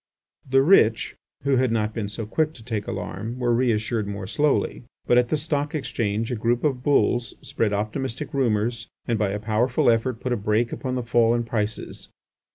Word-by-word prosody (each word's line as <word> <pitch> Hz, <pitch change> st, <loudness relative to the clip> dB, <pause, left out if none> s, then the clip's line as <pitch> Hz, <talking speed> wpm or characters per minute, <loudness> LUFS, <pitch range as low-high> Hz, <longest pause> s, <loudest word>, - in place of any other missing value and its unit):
The 135 Hz, +1 st, +5 dB
rich, 115 Hz, -, +4 dB, 0.3 s
who 140 Hz, -1 st, +2 dB
had 130 Hz, -1 st, +2 dB
not 110 Hz, -1 st, 0 dB
been 105 Hz, -2 st, -3 dB
so 110 Hz, +2 st, -5 dB
quick 155 Hz, +8 st, 0 dB
to 115 Hz, -, -13 dB
take 110 Hz, -3 st, -3 dB
alarm, 115 Hz, +3 st, -5 dB
were 120 Hz, -1 st, +1 dB
reassured 115 Hz, -3 st, +1 dB
more 100 Hz, -1 st, -5 dB
slowly. 145 Hz, +8 st, 0 dB, 0.2 s
But 120 Hz, -, +5 dB
at 120 Hz, -1 st, +1 dB
the 155 Hz, -, +1 dB
Stock 150 Hz, 0 st, -2 dB
Exchange 115 Hz, -5 st, -2 dB
a -, -, 0 dB
group 120 Hz, +2 st, 0 dB
of 135 Hz, -5 st, 0 dB
"bulls" 125 Hz, -3 st, +2 dB
spread 110 Hz, -2 st, -1 dB
optimistic 115 Hz, +7 st, -3 dB
rumours 115 Hz, -3 st, 0 dB, 0.2 s
and 115 Hz, -3 st, 0 dB
by 105 Hz, -2 st, +1 dB
a 100 Hz, -, -2 dB
powerful 115 Hz, +3 st, +2 dB
effort 115 Hz, +1 st, 0 dB
put 125 Hz, 0 st, -1 dB
a -, -, 0 dB
brake 110 Hz, +3 st, +1 dB
upon 130 Hz, -1 st, -3 dB
the 125 Hz, -, -2 dB
fall 115 Hz, 0 st, +3 dB
in 120 Hz, -, 0 dB
prices. 110 Hz, -2 st, -4 dB
120 Hz, 190 wpm, -24 LUFS, 110-130 Hz, 0.3 s, The